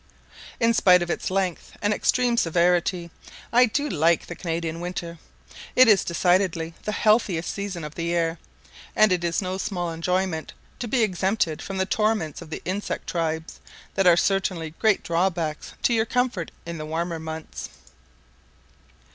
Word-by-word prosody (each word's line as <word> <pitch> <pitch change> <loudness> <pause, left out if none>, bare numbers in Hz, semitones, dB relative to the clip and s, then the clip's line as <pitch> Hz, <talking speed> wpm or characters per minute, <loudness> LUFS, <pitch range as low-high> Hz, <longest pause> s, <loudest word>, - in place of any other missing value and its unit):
In 230 0 +3
spite 180 -5 +5
of 175 - -3
its - - -2
length 185 -2 -2
and 205 +1 +1
extreme 245 +2 +2
severity, 175 -1 +1 0.4
I 250 +1 +6
do 285 +6 -1
like 165 - +2
the - - -7
Canadian 165 -1 -3
winter: 170 -1 -5 0.6
it 255 -1 +7
is 210 -4 +5
decidedly 175 -1 +1
the 210 - -1
healthiest 210 -6 +2
season 200 -4 -4
of 150 0 -6
the 170 - -4
year; 170 -1 0 0.6
and 215 -2 +5
it 180 -1 +1
is 170 +3 0
no 185 +1 -3
small 175 -4 -2
enjoyment 180 0 -1 0.3
to 240 - -3
be 240 0 +2
exempted 190 -3 0
from 195 - -5
the 190 - +1
torments 210 -7 0
of 165 - -10
the - - -6
insect 195 +3 -3
tribes, 160 -1 -3 0.3
that 195 -2 +2
are 170 -1 +7
certainly 185 -4 0
great 215 -3 +3
drawbacks 170 -2 -1
to 240 - +3
your 225 -1 +2
comfort 245 -9 0 0.2
in 170 -1 -6
the 155 - -5
warmer 165 +1 -2
months. 160 0 -7
180 Hz, 160 wpm, -24 LUFS, 165-205 Hz, 0.6 s, it